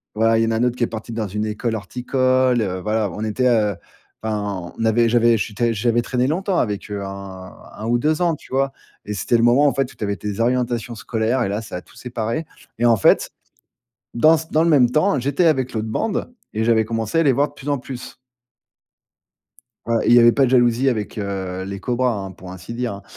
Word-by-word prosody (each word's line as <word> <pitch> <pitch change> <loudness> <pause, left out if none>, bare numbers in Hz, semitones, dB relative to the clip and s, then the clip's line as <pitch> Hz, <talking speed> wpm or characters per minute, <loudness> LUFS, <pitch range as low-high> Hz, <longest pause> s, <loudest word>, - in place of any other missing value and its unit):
voilà, 115 +1 +3
il 115 - +3
y - - -2
en - - 0
a - - 0
un 115 - +1
autre 125 -1 +1
qui 125 - -1
est - - +2
parti 110 +1 -7
dans 110 -2 -3
une 105 +3 -3
école 110 +2 -2
horticole, 130 +3 +1
heu. 95 -3 -2
Voilà, 105 0 0
on 105 - -5
était 110 +4 0
heu 105 -4 +2 0.5
enfin, 100 -5 -3
on 115 - -1
avait 115 +1 +3
j'avais 120 -1 +4
j'étais 115 +2 -1
j'avais 120 +2 +1
traîné 125 +1 -1
longtemps 185 +5 0
avec 105 -2 -2
eux, 100 -1 -4
hein, 95 -1 -8 0.3
heu, - - -11
1 - - -3
ou 120 - +2
2 155 +5 0
ans, 170 -2 +2
tu - - -18
vois? 135 0 +1 0.3
Et 105 - -4
c'était 115 +4 +1
le 115 - +1
moment 125 +5 +5
en 140 - +2
fait, 135 -2 -1
où - - -18
tu - - -6
avais 100 0 -1
tes 105 0 -5
orientations 120 0 0
scolaires 115 +3 -1
et 95 - -1
là, 105 +2 -2
ça 110 - -8
a 90 - -4
tout - - -22
séparé. 120 +5 -3 0.3
Et 120 - +2
en 120 -1 +6
fait, 95 - +3 0.8
dans 155 +7 +5
c 160 - -6
dans 155 - +3
le 170 - +2
même 135 -6 +5
temps, 155 +4 +2
j'étais 140 +7 +1
avec 130 -6 +2
l'autre 110 0 -2
bande 220 - -2 0.2
et 110 - -1
j'avais 115 -1 +3
commencé 115 +6 -1
à - - +4
les 140 - +4
voir 140 +3 +2
de - - -19
plus 140 0 -7
en 145 - +1
plus. 125 -1 -8 1.7
Ouais 115 0 +1
et - - +2
il 120 - +7
y 120 - +8
avait 120 0 +7
pas 135 - +3
de - - -1
jalousie 120 +1 +3
avec, 110 -3 -2
heu, 95 -2 -4
les 100 +1 -6
cobras, 125 +3 0
hein, 95 -2 -5
pour 95 0 -11
ainsi 95 +4 -9
dire, 120 -2 -3
hein. 100 - -10
115 Hz, 245 wpm, -21 LUFS, 105-130 Hz, 1.7 s, y